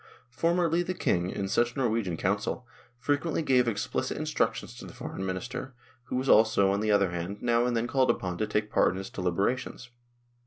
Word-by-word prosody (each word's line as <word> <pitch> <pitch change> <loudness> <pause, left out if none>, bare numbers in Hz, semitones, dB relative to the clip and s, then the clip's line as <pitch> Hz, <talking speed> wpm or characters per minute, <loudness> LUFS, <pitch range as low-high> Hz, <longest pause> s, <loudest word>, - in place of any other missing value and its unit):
Formerly 170 +5 +1
the 185 +1 -3
King, 90 - 0
in 95 +1 -3
such 120 +4 +1
Norwegian 115 -9 0
council, 100 +7 -1 0.3
frequently 145 +5 0
gave 125 -4 +3
explicit 105 -4 -2
instructions - - -1
to - - -9
the - - -12
Foreign 95 - -6
Minister, 125 +8 -4 0.3
who - - -4
was 130 +1 -1
also, 105 -4 +5
on 100 - 0
the 110 +1 -1
other 100 -3 +3
hand, 90 +4 -4
now 120 0 +3
and 120 -1 0
then 115 - 0
called 130 +1 +2
upon 90 -1 -1
to 110 - 0
take 105 0 -1
part 90 - +3
in - - -4
its 95 - -7
deliberations. 100 +7 -2
115 Hz, 190 wpm, -28 LUFS, 95-125 Hz, 0.3 s, also